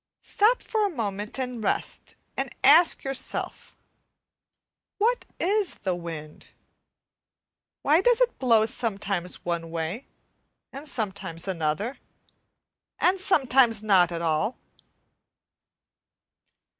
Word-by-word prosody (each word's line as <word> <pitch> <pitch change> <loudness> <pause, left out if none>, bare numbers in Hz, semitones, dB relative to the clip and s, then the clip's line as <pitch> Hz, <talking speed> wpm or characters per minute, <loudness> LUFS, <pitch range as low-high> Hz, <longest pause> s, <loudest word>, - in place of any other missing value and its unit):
Stop 445 +5 +2
for 430 -2 0
a - - -4
moment 210 - -4
and 250 -3 -4
rest, - - -2 0.2
and 270 -1 -2
ask 310 +5 +6
yourself, 270 -1 -3 1.2
what 470 +4 +1
is 400 +2 +1
the 190 -3 -2
wind? 165 -3 -8 1.4
Why 310 +5 +4
does 485 +2 +4
it - - +1
blow 230 -4 +4
sometimes 200 -6 -3
one 170 -1 -2
way 170 +9 -4 0.7
and 280 +3 -7
sometimes 195 - -4
another, 185 - -2 1.0
and 375 +2 +3
sometimes 260 - +3
not 185 -5 +4
at 170 0 -4
all? 165 +9 0
225 Hz, 100 wpm, -26 LUFS, 180-295 Hz, 1.4 s, ask